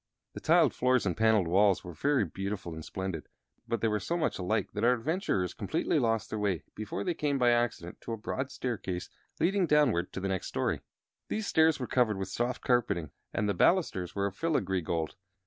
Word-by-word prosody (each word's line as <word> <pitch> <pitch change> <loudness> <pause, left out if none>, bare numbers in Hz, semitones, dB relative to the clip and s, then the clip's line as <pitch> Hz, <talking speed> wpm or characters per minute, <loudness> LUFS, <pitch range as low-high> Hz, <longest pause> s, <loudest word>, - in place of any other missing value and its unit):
The - - -6
tiled - - +4
floors 125 -2 +2
and 90 -4 0
paneled 110 -5 +3
walls 95 +2 +4
were 90 - -8
very 135 - +2
beautiful 95 0 -4
and 80 0 -7
splendid; 95 -4 -5 0.4
but 115 -2 -1
they 115 - +3
were 105 -1 +1
so 170 - -2
much 165 - -1
alike 100 +2 0
that 105 - -3
our 125 +1 +6
adventurers 125 - -1
completely - - 0
lost 115 -1 0
their 110 - -2
way 100 -5 0
before 110 -1 -4
they 180 - 0
came 145 -3 0
by 125 -2 +4
accident 120 -8 -1
to - - -6
a 115 - -2
broad 130 +5 -3
staircase 100 -9 -4 0.3
leading 190 +1 +2
downward 140 - +3
to - - -3
the 95 - -2
next 95 -1 -2
story. - - -1 0.5
These 215 0 -2
stairs 160 -4 +4
were 125 - -2
covered 120 -5 +2
with 95 -1 -4
soft 120 +5 -2
carpeting 105 - +1 0.2
and 105 - 0
the 100 - +1
balusters 95 - +2
were 100 0 0
of 100 -1 -3
filigree 100 - 0
gold. 80 -1 -2
110 Hz, 205 wpm, -30 LUFS, 95-125 Hz, 0.5 s, our